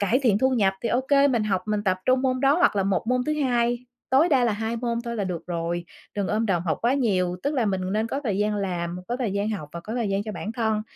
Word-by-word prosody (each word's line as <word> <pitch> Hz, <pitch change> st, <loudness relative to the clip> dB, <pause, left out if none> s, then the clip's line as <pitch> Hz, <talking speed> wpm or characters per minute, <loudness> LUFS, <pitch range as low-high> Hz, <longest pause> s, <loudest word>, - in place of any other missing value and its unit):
cải 210 Hz, +5 st, +2 dB
thiện 215 Hz, -6 st, +3 dB
thu 260 Hz, +3 st, +3 dB
nhập 210 Hz, -7 st, +3 dB
thì 235 Hz, -, 0 dB
ô 245 Hz, -, +2 dB
kê 280 Hz, +1 st, +4 dB
mình 235 Hz, -5 st, +1 dB
học, 190 Hz, -3 st, 0 dB
mình 210 Hz, -1 st, -1 dB
tập 185 Hz, -2 st, +1 dB
trung 255 Hz, 0 st, +3 dB
môn 255 Hz, -1 st, +1 dB
đó 275 Hz, +2 st, +4 dB
hoặc 355 Hz, -, +3 dB
là 195 Hz, -, +3 dB
một 195 Hz, +2 st, 0 dB
môn 250 Hz, +1 st, +2 dB
thứ 305 Hz, -, +1 dB
2, 240 Hz, -2 st, +1 dB, 0.3 s
tối 280 Hz, +6 st, +5 dB
đa 265 Hz, -6 st, +3 dB
là 235 Hz, -, +2 dB
2 220 Hz, +2 st, -2 dB
môn 235 Hz, 0 st, -1 dB
thôi 235 Hz, 0 st, -4 dB
là 205 Hz, -, -1 dB
được 175 Hz, -3 st, -4 dB
rồi, 170 Hz, 0 st, -2 dB, 0.3 s
đừng 200 Hz, -2 st, -1 dB
ôm 220 Hz, +2 st, 0 dB
đồm 175 Hz, -5 st, +1 dB
học 160 Hz, -3 st, -1 dB
quá 240 Hz, +3 st, +3 dB
nhiều. 185 Hz, -9 st, +1 dB
Tức 285 Hz, +2 st, -1 dB
là 245 Hz, -5 st, +1 dB
mình 190 Hz, -2 st, 0 dB
nên 215 Hz, +2 st, +1 dB
có 275 Hz, +5 st, -3 dB
thời 200 Hz, -4 st, 0 dB
gian 210 Hz, 0 st, +1 dB
làm, 175 Hz, -3 st, -2 dB
có 245 Hz, -, -1 dB
thời 245 Hz, -6 st, -2 dB
gian 200 Hz, +2 st, -1 dB
học 190 Hz, -9 st, -4 dB
và 170 Hz, -, -6 dB
có 215 Hz, +6 st, -6 dB
thời 235 Hz, -4 st, -1 dB
gian 195 Hz, 0 st, 0 dB
cho 215 Hz, 0 st, -5 dB
bản 210 Hz, +1 st, -5 dB
thân. 220 Hz, -2 st, 0 dB
220 Hz, 295 wpm, -25 LUFS, 195-245 Hz, 0.3 s, tối